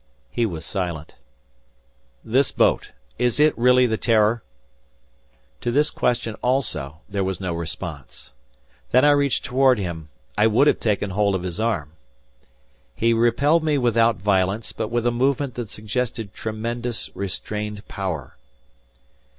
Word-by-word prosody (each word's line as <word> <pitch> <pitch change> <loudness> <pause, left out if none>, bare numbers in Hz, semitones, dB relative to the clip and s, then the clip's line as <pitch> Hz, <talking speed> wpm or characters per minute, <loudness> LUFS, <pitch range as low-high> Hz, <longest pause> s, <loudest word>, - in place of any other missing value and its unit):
He 120 -1 +1
was 85 -5 -6
silent. 85 -6 -4 1.1
"This 130 +4 +2
boat! - - +2 0.3
Is 125 +2 +1
it 150 +1 +5
really 125 +1 +5
the 110 -2 0
'Terror?'" 110 0 +3 1.2
To 120 - -2
this 145 +5 +2
question 120 -2 0
also 80 - -1
there 100 -2 -2
was 95 0 -2
no 90 -3 -3
response. 85 -3 -6 0.6
Then 130 +3 +5
I 145 - +7
reached 140 -2 +1
toward 130 -1 +4
him; 85 -6 -5 0.3
I 105 +1 +4
would 115 +6 +4
have 150 - +3
taken 105 -2 0
hold 100 0 +1
of 90 - -3
his 90 +2 -4
arm. 105 -11 -1 1.0
He 115 +1 +2
repelled 135 +8 +3
me 150 -2 +2
without 115 -2 +3
violence, 95 +3 0
but - - -3
with 120 +1 -1
a 120 - +3
movement 135 +2 0
that 120 -2 -5
suggested 110 0 -3
tremendous 115 +2 -4
restrained 105 +2 -5
power. 90 -9 -5
110 Hz, 140 wpm, -23 LUFS, 95-125 Hz, 1.2 s, I